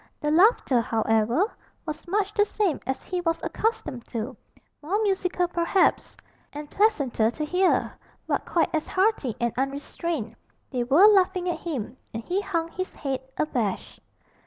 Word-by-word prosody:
The 295 - -1
laughter, 330 - +4
however, 225 - +1 0.3
was 310 +1 -6
much 400 +2 0
the 415 - +4
same 410 -5 0
as 265 - -2
he 360 -1 -3
was 330 -1 0
accustomed 325 - -2
to, 235 +3 -4 0.5
more 360 +8 -1
musical 370 -3 +1
perhaps, 345 +2 +1 0.3
and 295 0 -8
pleasanter 285 - +2
to 300 +6 -4
hear, 360 +4 +2 0.3
but - - -1
quite 340 - 0
as 310 -1 -1
hearty 375 - +1
and 235 -1 0
unrestrained 275 -2 -3 0.4
they 250 -2 0
were 285 +11 +6
laughing 380 -3 +4
at 350 - -1
him, 265 -7 -5 0.2
and 225 - -4
he 370 - -1
hung 335 -5 -2
his 370 +2 -5
head 270 -3 -2 0.2
abashed. 240 -10 -2
325 Hz, 150 wpm, -26 LUFS, 260-375 Hz, 0.5 s, were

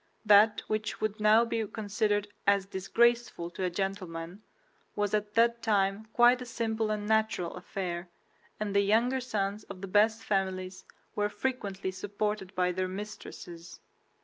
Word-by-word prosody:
That 210 +1 +6
which 215 0 -2
would 215 0 -2
now 215 +2 +5
be 230 -2 -2
considered 205 -1 -1 0.2
as 200 -1 +4
disgraceful 230 -1 +1
to 185 - -5
a - - +1
gentleman 185 -1 -4 0.5
was 205 -1 -1
at 210 0 -1
that 235 0 +3
time 205 -1 +1
quite 245 +2 +5
a - - -5
simple 225 -2 -1
and 210 -1 -2
natural 220 -5 +1
affair, 180 -1 -5 0.5
and 205 -1 -3
the 200 - +6
younger 230 +6 +2
sons 210 -4 -2
of 185 - -10
the 195 - -5
best 215 +3 +3
families 190 -2 -2 0.3
were 205 0 +1
frequently 205 -4 -3
supported 200 +1 -3
by 180 0 +2
their 185 +1 -1
mistresses. 185 -4 -8
205 Hz, 150 wpm, -30 LUFS, 190-220 Hz, 0.5 s, That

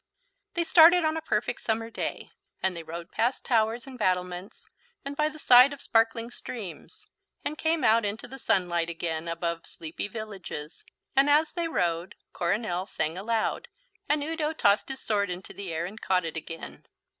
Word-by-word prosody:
They 345 - +2
started 335 +1 +7
on 315 0 +1
a 320 - -2
perfect 245 -4 -1
summer 225 0 -1
day, - - -4 0.3
and 190 -1 +1
they 170 - -5
rode 170 +2 -8
past 245 +3 0
towers 230 -1 +1
and 260 -2 -10
battlements, 180 +2 -2 0.4
and 280 +1 -4
by 300 +1 +2
the 310 - -11
side 255 -1 +7
of 285 - -9
sparkling 230 +1 +1
streams, 215 -8 -8 0.4
and 295 - -2
came 320 +1 0
out 225 +1 +5
into 210 +4 -3
the 270 +2 -10
sunlight 175 -6 +1
again 165 -1 -3
above 170 0 -3
sleepy 160 +4 -5
villages, 195 -8 -7 0.3
and, 275 +2 +5
as 300 +2 +4
they 340 -1 -1
rode, 175 - -1 0.2
Coronel 185 0 -1
sang 160 -4 -2
aloud 225 - -1 0.4
and 295 0 +2
Udo 315 0 -1
tossed 205 -7 +3
his 265 0 -5
sword 200 -3 +1
into 180 +1 -6
the 195 -4 -5
air 165 +1 -2
and 205 +4 -8
caught 185 -2 +1
it 165 - -4
again. 165 0 -7
215 Hz, 175 wpm, -28 LUFS, 175-270 Hz, 0.4 s, started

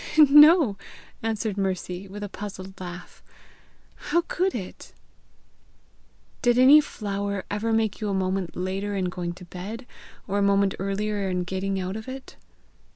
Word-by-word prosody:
"No," 295 - +7 0.4
answered 220 -2 -2
Mercy, 185 0 -3
with 205 +2 -8
a - - -3
puzzled 190 -1 -8
laugh; 180 0 -9 0.9
"how 345 - +3
could 370 +1 0
it?" 190 -6 -8 1.5
"Did 240 0 +3
any 275 +4 +8
flower 200 -6 -4
ever 215 +2 -1
make 220 -1 0
you 210 - -1
a - - -1
moment 185 -1 -1
later 195 +3 -3
in 185 -2 -1
going 175 -1 -4
to 180 +1 -12
bed, 200 +8 -7 0.4
or 200 0 0
a - - +1
moment 200 -1 +3
earlier 200 +1 -2
in 180 -1 -1
getting 190 +1 -2
out 185 +1 -3
of 220 +2 -7
it?" 265 0 -8
200 Hz, 150 wpm, -25 LUFS, 190-225 Hz, 1.5 s, any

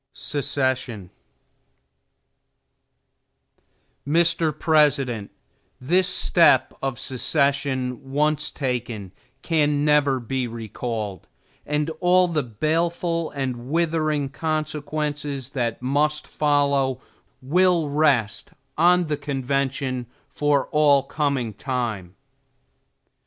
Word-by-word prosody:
STEPHENS 130 -8 -2 3.0
Mr. 165 -1 +2
President: 140 - +2 0.5
This 180 +8 +2
step - - +4
of 135 -3 -2
secession, 135 0 -1
once 150 +1 +1
taken, 120 -7 -4 0.3
can 150 -3 +1
never 145 -3 +3
be 125 +1 -2
recalled; 110 -3 -5 0.4
and 150 +2 -1
all 180 0 +4
the 160 -3 0
baleful 165 +7 -1
and 130 -3 -4
withering 155 -3 0
consequences 150 -3 -3
that 120 -3 -2
must 150 +3 +1
follow, 140 -3 +1 0.4
will 175 +3 +2
rest 140 -8 +1 0.3
on 180 +1 +5
the 150 -2 -2
convention 135 -2 -2 0.2
for 145 -2 +1
all 145 -2 +4
coming 140 -5 -1
time. 110 -7 -4
140 Hz, 85 wpm, -23 LUFS, 125-155 Hz, 3.0 s, on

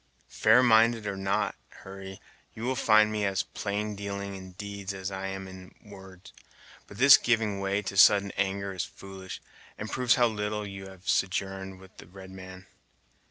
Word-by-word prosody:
"Fair 110 +4 +4
minded 115 -1 +4
or 100 -1 -3
not, 95 +1 -1 0.2
Hurry, 95 0 -10 0.4
you 110 - -8
will 130 +2 -1
find 110 -2 +4
me 105 -1 -2
as 95 -1 0
plaindealing 100 -1 -4
in 95 -1 -10
deeds 100 0 -6
as 95 0 -5
I 95 0 -4
am 95 0 -6
in 95 0 -12
words. 95 -2 -14 0.5
But 105 - -13
this 135 +3 +9
giving 110 -4 0
way 100 +1 -1
to 100 - -5
sudden 100 +1 +6
anger 100 0 -2
is 90 - -2
foolish, 95 -1 -10 0.3
and 105 - -6
proves 125 -2 +3
how 125 - +4
little 105 -1 -2
you 95 -1 -8
have 95 -1 -15
sojourned 95 0 -1
with 95 0 -17
the - - -13
red 95 +1 -12
man. 95 0 -11
100 Hz, 170 wpm, -28 LUFS, 95-105 Hz, 0.5 s, this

